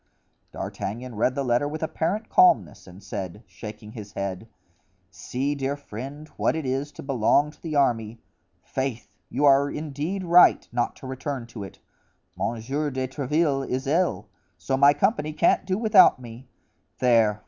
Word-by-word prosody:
D'Artagnan 120 Hz, +5 st, -5 dB
read 115 Hz, +4 st, +1 dB
the 140 Hz, -, -1 dB
letter 125 Hz, +2 st, +1 dB
with 155 Hz, +2 st, -5 dB
apparent 180 Hz, +7 st, -2 dB
calmness 365 Hz, -, +3 dB
and 95 Hz, +2 st, -13 dB
said, 100 Hz, +1 st, -6 dB
shaking 105 Hz, -1 st, -10 dB
his 105 Hz, -3 st, -10 dB
head: 100 Hz, +2 st, -4 dB, 0.6 s
"See, 135 Hz, +8 st, -3 dB
dear 140 Hz, 0 st, -2 dB
friend, 140 Hz, +4 st, -8 dB
what -, -, +1 dB
it 160 Hz, -3 st, -3 dB
is 135 Hz, +3 st, -2 dB
to -, -, -10 dB
belong 140 Hz, +2 st, +2 dB
to -, -, -24 dB
the 160 Hz, -3 st, -4 dB
army. 115 Hz, -5 st, +1 dB, 0.4 s
Faith, 130 Hz, -3 st, -4 dB
you 145 Hz, +4 st, 0 dB
are 140 Hz, 0 st, +5 dB
indeed 155 Hz, +6 st, -4 dB
right 175 Hz, 0 st, +5 dB
not 120 Hz, 0 st, -1 dB
to -, -, -13 dB
return 130 Hz, -1 st, -4 dB
to 115 Hz, -3 st, -8 dB
it. 95 Hz, -, -10 dB, 0.6 s
Monsieur 135 Hz, +7 st, -2 dB
de 130 Hz, -1 st, -3 dB
Tréville 140 Hz, +1 st, 0 dB
is 130 Hz, +2 st, -2 dB
ill, 170 Hz, +6 st, 0 dB, 0.3 s
so 135 Hz, -, -1 dB
my 140 Hz, +2 st, +6 dB
company 155 Hz, -1 st, 0 dB
can't 170 Hz, +3 st, +2 dB
do 185 Hz, -1 st, 0 dB
without 205 Hz, -, +6 dB
me; 120 Hz, +1 st, -11 dB, 0.5 s
there! 115 Hz, -4 st, +3 dB
135 Hz, 160 wpm, -25 LUFS, 115-150 Hz, 0.6 s, my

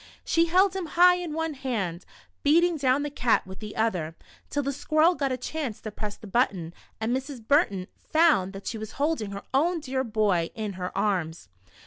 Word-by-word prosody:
She 335 Hz, -1 st, +3 dB
held 370 Hz, +3 st, +3 dB
him 375 Hz, -3 st, -3 dB
high 360 Hz, 0 st, +7 dB
in 350 Hz, -3 st, -4 dB
one 320 Hz, 0 st, -2 dB
hand, 210 Hz, -11 st, -3 dB, 0.4 s
beat 310 Hz, +4 st, +5 dB
ing 350 Hz, -2 st, +1 dB
down 275 Hz, 0 st, +2 dB
the 295 Hz, -, -3 dB
cat 245 Hz, -5 st, +2 dB
with 190 Hz, 0 st, -10 dB
the 210 Hz, -1 st, -8 dB
other, 180 Hz, -8 st, -1 dB, 0.3 s
till 290 Hz, -1 st, -1 dB
the 280 Hz, +1 st, -1 dB
squirrel 310 Hz, +5 st, +3 dB
got 275 Hz, -5 st, -1 dB
a 255 Hz, -, -1 dB
chance 260 Hz, -3 st, -4 dB
to 215 Hz, -, -6 dB
press 210 Hz, 0 st, -6 dB
the -, -, -13 dB
button, 190 Hz, -6 st, 0 dB, 0.3 s
and 225 Hz, +3 st, 0 dB
Mrs. 265 Hz, -4 st, -6 dB
Burton 205 Hz, -, +3 dB, 0.2 s
found 310 Hz, -, +4 dB
that 195 Hz, 0 st, -9 dB
she 225 Hz, -, -4 dB
was 215 Hz, +1 st, -7 dB
holding 285 Hz, -7 st, -1 dB
her 200 Hz, 0 st, -7 dB
own 335 Hz, +6 st, +2 dB
dear 265 Hz, -3 st, -2 dB
boy 210 Hz, -7 st, +1 dB
in 215 Hz, -3 st, -4 dB
her 180 Hz, 0 st, -5 dB
arms. 175 Hz, -, -1 dB
255 Hz, 200 wpm, -26 LUFS, 200-310 Hz, 0.4 s, high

